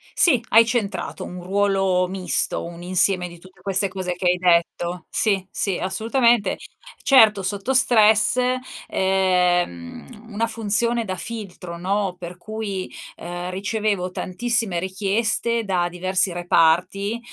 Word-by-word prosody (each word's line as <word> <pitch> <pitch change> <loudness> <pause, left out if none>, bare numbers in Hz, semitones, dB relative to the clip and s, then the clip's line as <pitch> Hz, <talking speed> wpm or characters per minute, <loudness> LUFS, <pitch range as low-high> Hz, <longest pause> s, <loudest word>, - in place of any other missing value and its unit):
Sì, 255 -9 +4
hai 225 +1 +6
centrato. 210 -7 -3
Un 180 0 -8
ruolo 195 -1 +1
misto, 185 0 -1
un 170 0 -9
insieme 180 0 +2
di 170 -1 -13
tutte 185 0 -18
queste 195 +1 +1
cose 185 -1 -4
che 180 +1 -7
hai 180 - 0
detto. 175 0 0
Sì, 195 -4 +1
sì, 195 -3 -2
assolutamente. 225 +2 +1 0.4
Certo, 220 -7 +5
sotto 200 +6 -2
stress, 220 -2 +4 0.5
ehm, 185 - -1
una 225 +3 -1
funzione 230 +1 0
da 185 -1 -4
filtro, 185 -5 -7
no, 190 +1 -1
per 175 0 -9
cui, 205 -2 -5 0.2
ehm, 175 +1 -6
ricevevo 200 -1 -2
tantissime 210 -1 -1
richieste 220 +5 -1
da 180 -3 0
diversi 185 +1 0
reparti 180 +5 +1
190 Hz, 125 wpm, -22 LUFS, 180-220 Hz, 0.5 s, hai